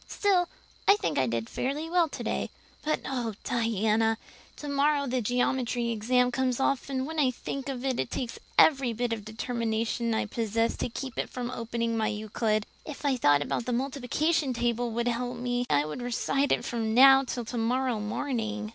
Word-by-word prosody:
Still, 370 Hz, -4 st, +2 dB, 0.4 s
I 400 Hz, -, +8 dB
think 415 Hz, -, -1 dB
I 130 Hz, -, +2 dB
did 115 Hz, -1 st, -2 dB
fairly 285 Hz, +5 st, -2 dB
well 340 Hz, -1 st, +2 dB
today. -, -, -3 dB, 0.3 s
But 310 Hz, 0 st, 0 dB
oh, 240 Hz, -5 st, -2 dB
Diana, 225 Hz, -1 st, +1 dB, 0.4 s
tomorrow 285 Hz, 0 st, +1 dB
the 255 Hz, -1 st, 0 dB
geometry 245 Hz, 0 st, 0 dB
exam 250 Hz, +3 st, +2 dB
comes 255 Hz, 0 st, 0 dB
off 275 Hz, 0 st, 0 dB
and 260 Hz, -1 st, -1 dB
when 320 Hz, +2 st, -4 dB
I 275 Hz, -3 st, +4 dB
think 270 Hz, +2 st, -5 dB
of 260 Hz, -1 st, -4 dB
it 260 Hz, -2 st, 0 dB
it 130 Hz, -, -1 dB
takes 245 Hz, -3 st, -4 dB, 0.2 s
every 270 Hz, -6 st, +5 dB
bit 240 Hz, +1 st, -1 dB
of 220 Hz, -2 st, -5 dB
determination 230 Hz, +1 st, -1 dB
I -, -, 0 dB
possess 225 Hz, +1 st, 0 dB
to -, -, -2 dB
keep 260 Hz, +2 st, -5 dB, 0.2 s
from 250 Hz, -1 st, -4 dB
opening 230 Hz, -1 st, -2 dB
my 220 Hz, -1 st, +1 dB
Euclid. 215 Hz, 0 st, -1 dB, 0.2 s
If 295 Hz, -1 st, -8 dB
I 275 Hz, -2 st, +3 dB
thought 145 Hz, -, +3 dB
the 240 Hz, +1 st, -2 dB
multiplication 275 Hz, +3 st, 0 dB
table 240 Hz, 0 st, 0 dB
would 235 Hz, +1 st, -1 dB
help 245 Hz, +1 st, -1 dB
me 245 Hz, 0 st, -1 dB
any 145 Hz, 0 st, +3 dB
I -, -, -5 dB
would 155 Hz, +11 st, -5 dB
recite 275 Hz, +3 st, 0 dB
it -, -, +1 dB
from 225 Hz, -2 st, -1 dB
now 270 Hz, +1 st, +8 dB
till 245 Hz, -2 st, -4 dB
tomorrow 245 Hz, +1 st, 0 dB
morning. 215 Hz, -1 st, -2 dB
245 Hz, 180 wpm, -28 LUFS, 225-270 Hz, 0.4 s, I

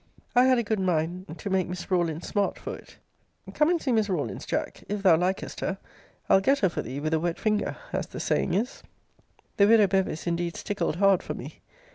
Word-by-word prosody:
I 250 Hz, +1 st, +6 dB
had 260 Hz, -1 st, +5 dB
a 235 Hz, -, +1 dB
good 215 Hz, -1 st, -1 dB
mind 175 Hz, -1 st, -1 dB
to 195 Hz, -, -5 dB
make 190 Hz, -1 st, +1 dB
Miss 180 Hz, +2 st, -7 dB
Rawlins 170 Hz, -3 st, 0 dB
smart 205 Hz, -2 st, 0 dB
for -, -, -6 dB
it. -, -, -15 dB, 0.6 s
Come 300 Hz, +1 st, +3 dB
and 350 Hz, -1 st, +2 dB
see 275 Hz, -, -1 dB
Miss 220 Hz, -3 st, +2 dB
Rawlins, 150 Hz, -, -3 dB
Jack. -, -, -3 dB
If 205 Hz, -1 st, -3 dB
thou 180 Hz, -4 st, +7 dB
likest 180 Hz, +3 st, -2 dB
her, 190 Hz, -, -2 dB, 0.5 s
I'll 195 Hz, -, +5 dB
get 275 Hz, +7 st, +3 dB
her 190 Hz, -, +4 dB
for -, -, -3 dB
thee 135 Hz, -, -6 dB
with 155 Hz, +2 st, -2 dB
a 160 Hz, -, +3 dB
wet 170 Hz, +1 st, -1 dB
finger, 215 Hz, -1 st, 0 dB, 0.2 s
as -, -, -1 dB
the -, -, -8 dB
saying 175 Hz, -, 0 dB
is! 230 Hz, +7 st, -2 dB, 0.8 s
The 200 Hz, -, +6 dB
widow 220 Hz, -1 st, +6 dB
Bevis 190 Hz, -4 st, 0 dB
indeed 170 Hz, 0 st, -2 dB
stickled 205 Hz, -6 st, -2 dB
hard 195 Hz, 0 st, +4 dB
for -, -, -5 dB
me. -, -, -9 dB
190 Hz, 215 wpm, -27 LUFS, 170-210 Hz, 0.8 s, thou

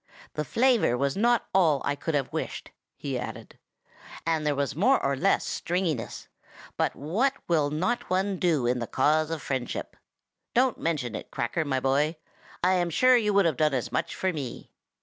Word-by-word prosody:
The 150 Hz, -, -2 dB
flavor 230 Hz, -, +2 dB
was 140 Hz, +1 st, 0 dB
not 240 Hz, +3 st, +2 dB
all 165 Hz, -7 st, +4 dB
I 145 Hz, -, +1 dB
could 160 Hz, +2 st, -3 dB
have 135 Hz, -3 st, -1 dB
wished," -, -, -4 dB, 0.3 s
he -, -, -3 dB
added, -, -, -8 dB, 0.7 s
"and 160 Hz, -2 st, 0 dB
there 145 Hz, -, +2 dB
was 140 Hz, -1 st, -1 dB
more 250 Hz, -, +4 dB
or 140 Hz, 0 st, +1 dB
less 195 Hz, +9 st, +2 dB
stringiness; 170 Hz, -8 st, -2 dB, 0.5 s
but -, -, 0 dB
what 215 Hz, -, 0 dB
will 155 Hz, -4 st, +2 dB
not 180 Hz, +11 st, -1 dB
one 190 Hz, +1 st, 0 dB
do 160 Hz, -8 st, +2 dB
in 125 Hz, +1 st, +1 dB
the 115 Hz, -, -3 dB
cause 155 Hz, +3 st, +2 dB
of 165 Hz, -2 st, -4 dB
friendship! 130 Hz, -3 st, -3 dB, 0.6 s
Don't 255 Hz, 0 st, +3 dB
mention 145 Hz, -8 st, -1 dB
it, -, -, -6 dB
Cracker, 120 Hz, +7 st, -2 dB
my 135 Hz, -2 st, 0 dB
boy! 140 Hz, +5 st, +1 dB, 0.5 s
I 185 Hz, +1 st, +4 dB
am 175 Hz, -2 st, +1 dB
sure 255 Hz, +10 st, +5 dB
you 215 Hz, -4 st, +2 dB
would 200 Hz, -2 st, +5 dB
have 160 Hz, -5 st, +1 dB
done 150 Hz, -3 st, +2 dB
as 125 Hz, -, -2 dB
much -, -, -2 dB
for 190 Hz, -1 st, -1 dB
me. 135 Hz, -6 st, -6 dB
155 Hz, 185 wpm, -27 LUFS, 140-190 Hz, 0.7 s, sure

